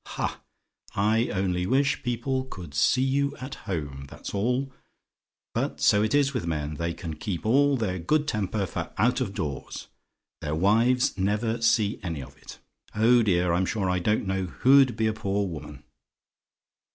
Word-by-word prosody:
Ha! - - -3 0.5
I 110 +4 +2
only 90 -2 -1
wish 140 +5 +2
people 130 +1 -2
could 90 - -9
see 125 - +3
you 140 +1 +1
at 130 +2 -6
home, 70 - -5
that's - - -8
all. 125 +6 0 0.8
But - - -2
so 105 - +4
it 110 +6 +1
is 140 -1 +3
with 115 -10 -2
men. 75 -2 -2
They 85 +2 -1
can 85 -4 -6
keep 90 +1 -4
all 140 +4 +4
their 95 -6 -2
good 150 - +1
temper 105 -3 -1
for - - -5
out 120 +6 +2
of 100 -6 -3
doors 70 -4 -5 0.5
their 75 - -2
wives 115 +6 +2
never 110 +4 0
see 110 -2 +2
any 80 -6 -4
of 65 +1 -13
it. - - -12 0.4
Oh 120 +3 +5
dear! 90 -5 +2
I'm 90 +2 +1
sure 95 -5 0
I 90 - +1
don't 105 +4 +1
know 95 0 -1
who'd 130 +4 +4
be 110 - +1
a 110 - +1
poor 100 -1 -1
woman! 75 -4 -8
105 Hz, 170 wpm, -26 LUFS, 90-125 Hz, 0.8 s, Oh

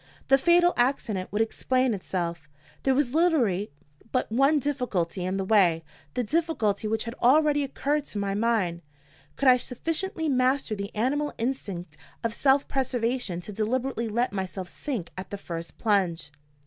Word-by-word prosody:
The 270 0 +6
fatal 350 +3 +5
accident 230 -7 0
would 210 +3 +2
explain 255 +2 0
itself. 170 -5 -4 0.3
There 265 -1 +2
was 270 -2 +1
literally 260 - +2 0.4
but 255 -4 0
one 275 +6 +4
difficulty 245 - -1
in 185 +2 -1
the 195 - -2
way 180 -6 +4 0.3
the 250 - +1
difficulty 225 -7 0
which 220 +1 0
had 230 - -5
already 290 +3 +4
occurred 285 +2 -1
to 215 - -7
my 200 -1 -1
mind. 205 -6 0 0.5
Could 275 - 0
I 250 -1 +8
sufficiently 325 +7 -3
master 255 -3 +1
the 200 -1 -4
animal 285 +7 0
instinct 195 - -4 0.3
of 230 -1 -1
self 275 +3 +3
preservation 245 -7 -1
to 195 - -8
deliberately 235 +3 -1
let 235 0 0
myself 190 -1 -4
sink 225 - -5
at 185 - -7
the 200 - -5
first 170 -3 -7
plunge? 180 - 0
230 Hz, 155 wpm, -27 LUFS, 195-270 Hz, 0.5 s, I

